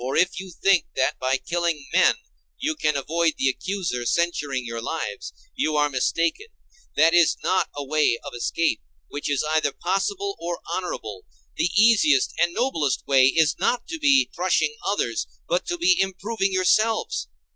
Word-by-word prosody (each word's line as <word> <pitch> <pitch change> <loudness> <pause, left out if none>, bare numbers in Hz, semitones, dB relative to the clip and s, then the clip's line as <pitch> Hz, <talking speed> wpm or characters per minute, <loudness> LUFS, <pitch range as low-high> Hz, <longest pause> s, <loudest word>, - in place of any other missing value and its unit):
For 130 +2 -2
if 180 +2 +2
you 190 0 -8
think 185 +1 +2
that 130 - 0
by 130 +1 +1
killing 170 -3 -2
men - - +5 0.4
you 310 +2 -2
can 150 - 0
avoid 160 +3 0
the 135 - +2
accuser 180 -5 -3
censuring 145 -7 -1
your 115 0 -5
lives, 165 - -5 0.2
you 155 - 0
are 150 0 +2
mistaken; 165 - 0 0.5
that 165 +2 +4
is 175 -2 +4
not 185 - +1
a 145 - -4
way 150 -4 +1
of - - -7
escape 155 - -1 0.3
which 145 - -4
is 145 0 0
either 155 -2 +2
possible 385 - -2
or 170 0 -4
honorable; 110 - -5 0.3
the - - +1
easiest 205 - +4
and 170 0 +3
noblest 160 - 0
way 135 -2 +5
is 150 +3 +2
not 245 -1 0
to 325 -1 -5
be 275 -2 +4
crushing 170 -4 +1
others, 120 - -1 0.2
but 175 +1 -1
to 350 - -2
be 355 +2 +4
improving 195 +2 -1
yourselves. 215 +4 +1
170 Hz, 165 wpm, -23 LUFS, 145-195 Hz, 0.5 s, men